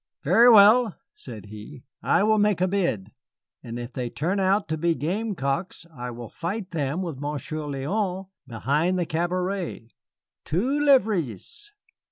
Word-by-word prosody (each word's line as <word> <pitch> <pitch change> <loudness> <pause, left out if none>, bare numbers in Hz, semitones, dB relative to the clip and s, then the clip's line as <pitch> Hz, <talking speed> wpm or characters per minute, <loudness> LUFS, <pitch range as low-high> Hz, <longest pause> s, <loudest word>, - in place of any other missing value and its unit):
"Very 235 +2 +6
well," 220 0 +6 0.2
said 110 -6 -10
he, 110 +6 -11 0.2
"I - - +2
will 215 0 +3
make 205 -3 +2
a 185 - +2
bid. 170 - -1 0.5
And 120 -2 -7
if 120 +1 -7
they 125 -2 -3
turn 170 +10 -2
out 195 +2 +2
to 160 - -1
be 170 +1 +1
gamecocks, 170 -2 -3
I 125 -1 -5
will 120 -1 -8
fight 185 - -5
them 155 +2 -2
with 160 -7 -5
Monsieur 145 +1 -4
Léon 185 +7 -2 0.2
behind 145 +10 0
the 175 - 0
cabaret. 175 - -3 0.5
Two 250 - 0
livres!" 220 - +1
170 Hz, 145 wpm, -25 LUFS, 135-200 Hz, 0.5 s, Very